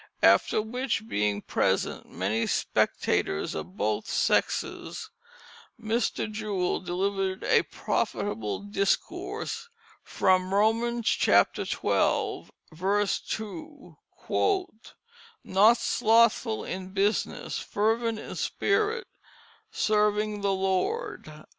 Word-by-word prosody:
After 215 - +4
which 235 0 -2
being 105 - 0
present - - -1
many 100 +6 -1
spectators 75 - 0
of 90 +4 -7
both 105 +1 -1
sexes, - - -1 0.7
Mr. 225 -1 -1
Jewell 210 -4 -1
delivered 190 +1 -2
a - - +4
profitable 110 - -2
discourse 205 - -2 0.3
from 185 0 +1
Romans 230 +2 +1
xii. - - +5
2: - - 0 3.0
"Not 215 +5 +5
slothful 225 -1 +2
in 185 +1 -6
business, 200 +2 -1
fervent 225 +2 0
in - - -7
spirit, 435 +3 0 0.6
serving 210 0 +1
the 200 0 +1
Lord." 190 - -2
210 Hz, 80 wpm, -27 LUFS, 185-225 Hz, 3.0 s, xii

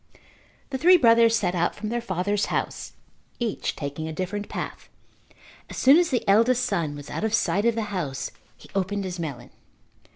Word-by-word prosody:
The 265 - -2
three 360 +4 +7
brothers 230 -4 +5
set 180 -5 0
out 175 -1 0
from 215 0 -5
their 240 +1 -2
father's 200 -1 -1
house, - - -3 0.4
each 235 -3 -2
taking 145 +2 -5
a - - -4
different 195 +5 -4
path. - - -6 0.8
As - - -8
soon 275 +4 +6
as 350 -1 +3
the 250 -4 -1
eldest 230 +5 +4
son 155 -4 -1
was 145 0 -9
out - - -4
of 220 0 +2
sight 205 -1 +1
of 235 -1 +3
the 225 - -1
house 145 -8 -3 0.3
he - - -15
opened 195 +1 -1
his 180 -2 -5
melon. 150 -7 -6
205 Hz, 185 wpm, -25 LUFS, 175-230 Hz, 0.8 s, three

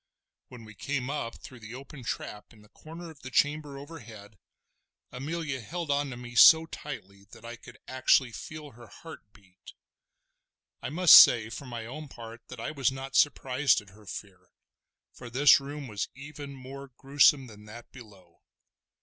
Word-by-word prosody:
When 125 -2 -12
we 110 - -13
came 135 +4 -3
up 115 -6 -4
through 130 - -11
the 110 +2 -10
open 135 0 -11
trap 105 -1 -6
in 105 -2 -19
the 105 - -21
corner 165 +5 -11
of 150 - -18
the 130 - -8
chamber 145 +1 0
overhead, 115 - -12 0.7
Amelia 145 0 -4
held 165 +6 -5
on 140 0 0
to 120 - -7
me 120 0 -10
so 160 +6 +8
tightly 100 -12 -9
that 105 - -16
I 120 +1 -7
could 115 - -15
actually 130 -1 +2
feel 155 +4 -9
her 120 0 -15
heart 160 -10 -13
beat. 95 -3 -18 1.1
I - - -4
must 175 +2 +6
say 115 -2 +9
for 140 - -8
my 120 -2 -6
own 150 +6 -8
part 115 -2 -11
that - - -10
I 115 - -4
was 135 -4 0
not 135 0 -8
surprised 135 -2 +3
at 105 -2 -15
her 105 +1 -19
fear, 90 -2 -10 0.6
for 125 - -11
this 135 +4 +6
room 140 0 -8
was 105 -3 -4
even 140 0 -9
more 135 +1 -10
gruesome 140 0 +4
than 105 -3 -14
that 115 +3 -12
below. 105 -7 -16
130 Hz, 175 wpm, -28 LUFS, 115-145 Hz, 1.1 s, say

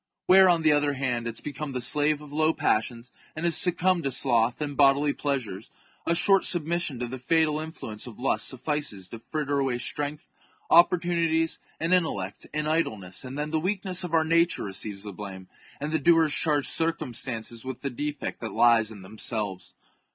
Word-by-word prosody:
Where, 190 0 +7
on 170 -2 +3
the 155 - +5
other 145 -1 +2
hand, 125 -4 -2
it 115 - -3
has - - -4
become 145 0 -6
the 130 - -2
slave 145 +4 +1
of 145 -1 -11
low 155 +1 +2
passions 115 +2 -1 0.2
and 155 +2 -3
has 170 -2 +2
succumbed 180 0 +3
to 135 - 0
sloth 120 -2 +1
and 145 -2 -3
bodily 140 +1 +4
pleasures, 130 -10 -3 0.4
a 170 - +2
short 190 +2 +4
submission 170 -4 0
to 120 0 -3
the 130 +2 -7
fatal 155 +3 +2
influence 140 -9 -6
of 115 - -11
lust 135 - +1
suffices 130 - -3
to 115 - -8
fritter 145 +2 -2
away 135 -3 0
strength, 145 +4 -4 0.4
opportunities, 170 -1 +3 0.2
and 165 +3 0
intellect, 100 - -1
in 150 0 -2
idleness, 110 - -1
and 130 +2 -7
then 150 +1 -3
the 160 - +1
weakness 190 +1 0
of 170 -2 -2
our 160 -1 +3
nature 165 +1 +2
re 100 - -5
ceives 100 +1 -6
the 105 -1 -7
blame, 95 -1 -8 0.3
and 150 +2 -4
the 160 - +1
doers 160 0 +4
charge 150 -3 +1
circumstances 120 -7 -2
with 130 -1 -6
the 140 - -3
defect 145 +3 -4
that 110 -4 -5
lies 115 -1 +4
in 105 -4 -11
themselves. 105 -1 -4
145 Hz, 190 wpm, -26 LUFS, 120-160 Hz, 0.4 s, Where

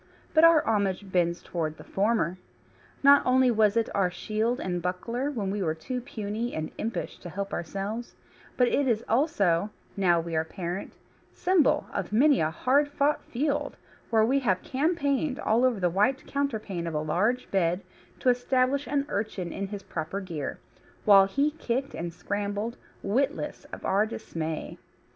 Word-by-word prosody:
But 315 - +5
our 330 -2 +7
homage 200 -3 0
bends 170 -1 +1
toward 155 -3 -3
the - - -11
former. 195 -4 0 0.6
Not 280 +1 +8
only 255 0 +4
was 215 -1 +3
it 230 - +2
our 195 -2 +2
shield 220 +6 -1
and 175 -1 -2
buckler 230 +10 -2
when 210 -9 -2
we 205 0 -2
were 160 -3 0
too 250 +10 -4
puny 225 -1 -4
and 155 0 -3
impish 225 +2 -4
to 175 - -8
help 200 +3 -4
ourselves, 200 +7 -4 0.4
but 250 - +4
it 280 +2 +1
is 230 -2 +1
also 210 - +2 0.3
(now 180 -4 +3
we 165 0 -4
are 160 - +2
parent) 175 +2 -5 0.4
symbol 355 -6 +3
of - - -3
many 275 +6 +5
a 155 - +2
hard 265 - +2
fought 290 0 0
field, 285 +3 -2 0.3
where 220 -1 +4
we 270 +4 +2
have 190 -8 0
campaigned 285 -1 0
all 225 +3 +2
over 250 -5 +2
the 180 - +2
white 205 +10 +1
counterpane 215 -11 -2
of 165 - -3
a - - +1
large 200 +11 0
bed 180 -1 +1 0.4
to 255 - +3
establish 255 +3 +1
an 280 -1 0
urchin 200 - -3
in 195 0 -3
his 200 0 -7
proper 165 +4 -4
gear, 165 -8 -5 0.5
while 195 -2 +8
he 280 +9 +1
kicked 270 -3 -3
and 170 0 -4
scrambled, 205 +5 -3 0.3
witless 265 +9 -1
of - - -8
our 205 +3 +2
dismay. 160 -8 -5
215 Hz, 165 wpm, -27 LUFS, 180-260 Hz, 0.6 s, Not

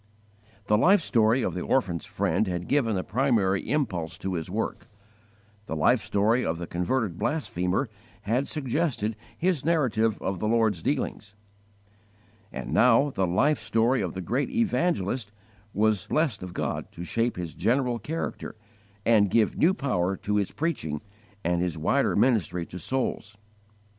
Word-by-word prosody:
The 105 +1 +3
life 195 - +6
story 120 -5 +2
of - - -1
the 90 - -3
orphan's 90 - 0
friend 100 +1 0
had 90 -1 -3
given 125 -7 +2
the 90 - -1
primary 105 -5 +1
impulse 100 - -1
to 95 - -3
his 80 -3 -3
work; - - -3 0.8
the 80 - -3
life 115 +10 +3
story 110 +5 +2
of 80 - -1
the 85 - -5
converted 90 +2 -1
blasphemer 110 - -1 0.3
had 125 +6 0
suggested 135 -6 -1 0.2
his 175 -5 +1
narrative 125 -9 +1
of 95 -2 -3
the 105 - -1
Lord's 110 -6 +2
dealings; 105 +5 -2 1.2
and - - -5
now 125 +4 +5
the 95 -6 0
life 135 - +2
story 115 +3 +1
of 90 -3 -3
the 95 - -3
great 125 - -1
evangelist 170 - 0 0.4
was 105 -3 +1
blessed 150 -9 0
of 90 -1 -8
God - - -3
to 85 - -7
shape 115 +6 0
his 85 -3 -5
general 125 -1 +1
character 155 +1 -4 0.5
and 105 -3 +4
give 110 +2 +2
new 180 +4 +3
power 95 - 0
to 105 0 -1
his 100 -2 0
preaching 80 - -2 0.4
and 85 +1 +1
his 90 -2 -1
wider 80 - +1
ministry 100 -8 +2
to 90 - -9
souls. 105 -1 -3
110 Hz, 155 wpm, -27 LUFS, 90-130 Hz, 1.2 s, life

